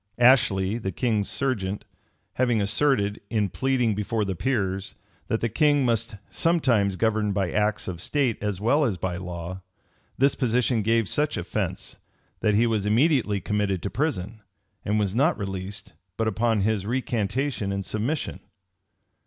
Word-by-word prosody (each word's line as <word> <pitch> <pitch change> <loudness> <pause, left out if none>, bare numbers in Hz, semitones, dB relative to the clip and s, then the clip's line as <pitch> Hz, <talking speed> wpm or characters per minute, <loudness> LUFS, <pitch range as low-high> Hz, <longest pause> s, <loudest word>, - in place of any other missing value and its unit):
Ashley, 115 -5 +4
the 95 -4 -3
king's 105 0 0
serjeant, 105 -8 -2 0.5
having 120 -3 +2
asserted, 105 0 +1
in 105 -3 0
pleading 125 -1 +1
before 105 +1 -1
the 95 - -2
peers, 95 -2 -1 0.3
that 110 - -1
the 115 - +1
king 145 +3 +3
must 115 -1 0 0.2
sometimes 125 - +2
govern 110 0 +1
by 95 -2 0
acts 105 0 0
of 85 -2 -5
state 130 -1 0
as 105 -3 -2
well 130 +9 +3
as 110 -9 0
by 90 0 -3
law, 90 0 -6 0.6
this 140 +2 +4
position 125 -2 +1
gave 115 0 +2
such 150 +6 0
offence, - - -3 0.4
that 105 - +2
he 115 +3 +4
was 110 -3 0
immediately 115 -3 +3
committed 100 -1 -1
to 100 - -3
prison, 115 - -2 0.4
and 105 +1 0
was 100 -3 0
not 140 +9 +2
released 95 -1 -5 0.2
but 110 - 0
upon 110 0 +1
his 105 -1 0
recantation 120 -1 -1
and 100 -1 -3
submission. 120 +9 -2
110 Hz, 150 wpm, -25 LUFS, 100-125 Hz, 0.6 s, Ashley